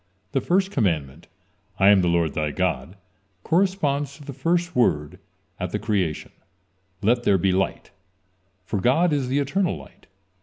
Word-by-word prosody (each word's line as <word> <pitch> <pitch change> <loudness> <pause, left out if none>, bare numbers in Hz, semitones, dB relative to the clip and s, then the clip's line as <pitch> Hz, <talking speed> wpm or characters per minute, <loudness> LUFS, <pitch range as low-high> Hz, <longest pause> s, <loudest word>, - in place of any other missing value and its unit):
The 135 - 0
first 190 +5 +1
commandment: 80 - -1 0.5
"I 95 - +5
am 100 -2 +6
the 90 - +1
Lord, 85 -3 +1
thy 75 -1 -1
God," 70 +5 -2 0.5
corresponds 150 -6 0
to 150 - -13
the 140 -1 -7
first 175 +6 -1
word 75 -12 +1 0.4
at - - -3
the - - -2
creation: 90 -7 -2 0.7
"Let 120 +4 +3
there 100 -5 +3
be 95 +1 +1
light," 95 +1 -1 0.7
for 100 0 -2
God 155 - +3
is 140 -3 0
the 130 +2 0
eternal 170 +7 0
light. - - -16
120 Hz, 155 wpm, -24 LUFS, 90-150 Hz, 0.7 s, am